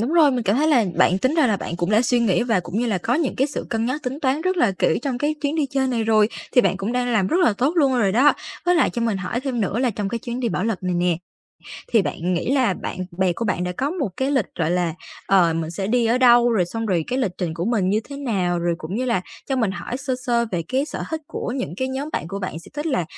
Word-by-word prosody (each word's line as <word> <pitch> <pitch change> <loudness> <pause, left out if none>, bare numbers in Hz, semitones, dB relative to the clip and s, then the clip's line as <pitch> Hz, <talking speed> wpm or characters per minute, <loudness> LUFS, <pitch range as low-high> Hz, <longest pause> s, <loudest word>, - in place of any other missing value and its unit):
đúng 240 +7 -1
rồi. 320 -4 +6
Mình 250 -2 -1
cảm 205 +1 +1
thấy 305 +3 +2
là 255 -8 +4
bạn 185 - +4
tính 260 +9 +1
ra 315 -5 +4
là 215 -4 +2
bạn 170 - -5
cũng 175 +2 -1
đã 215 +2 +4
suy 245 0 +2
nghĩ 195 -5 +2
và 230 -6 +1
cũng 175 +4 -4
như 245 - 0
là 210 -5 0
có 230 +7 0
những 305 -2 0
cái 270 - +2
sự 290 - -5
cân 225 0 0
nhắc, 275 +5 -2
tính 265 +4 -4
toán 270 +1 +1
rất 370 +3 0
là 235 - +3
kỹ - - +2
trong 260 -3 -2
cái 295 +3 0
chuyến 285 0 -1
đi 305 -3 +1
chơi 270 0 0
này 235 -3 0
rồi, 215 -1 +4 0.2
thì 250 - +6
bạn 195 - +1
cũng 200 +4 -3
đang 250 0 0
làm 205 -4 +2
rất 325 - +1
là 325 - +4
tốt 270 +5 +2
luôn 280 -5 +4
rồi 200 -5 +2
đó. 270 +7 +5 0.3
Với 355 0 +3
lại 335 - +3
cho 235 - -3
mình 225 -3 0
hỏi 195 +5 -3
thêm 260 -3 -2
nữa 200 +1 -1
là 250 -1 +2
trong 205 -2 -3
cái 230 - -3
chuyến 240 +1 -5
đi 240 - 0
Bảo 205 - -1
Lộc 220 -5 -2
này 180 -1 -1
nè, 175 -1 +1 0.8
thì 225 -4 +5
bạn 180 0 -2
nghĩ 175 +9 -1
là 255 -8 +2
bạn - - -6 0.2
bè 190 -2 +2
của 230 - -4
bạn 185 -4 -1
đã 180 - -2
có 265 +10 -2
một 320 - -2
cái 265 +1 0
lịch, 265 -8 +1
gọi 155 - +1
là, 175 -2 0 0.3
ờ, 180 -4 +4
mình 165 -1 -2
sẽ 190 +3 -3
đi 235 +2 +2
ở 235 +3 +2
đâu, 240 -1 +6
rồi 195 -6 +2
xong 225 +6 -4
rồi 175 -6 +1
cái 255 - -2
lịch 210 -9 0
trình 170 -4 -2
của 170 - -3
mình 210 -4 +1
như 210 +3 +2
thế 280 - -7
nào, 195 -11 -1
rồi 170 0 0
cũng 160 +5 -6
như 255 - -1
là 235 -7 +1 0.3
cho 270 - 0
mình 225 -6 +1
hỏi 220 +5 -5
sơ 265 -1 -2
sơ 235 -1 +2
về 175 -2 0
cái 265 +2 +1
sở - - -6
thích 320 -1 -2
của 240 - -4
những 255 -9 -4
cái 260 +3 -1
nhóm 270 +3 -3
bạn - - -3
của 195 - -4
bạn, 185 -4 -4
sẽ 165 - -14
thích 295 +2 -3
là 265 - 0
235 Hz, 310 wpm, -22 LUFS, 190-265 Hz, 0.8 s, rồi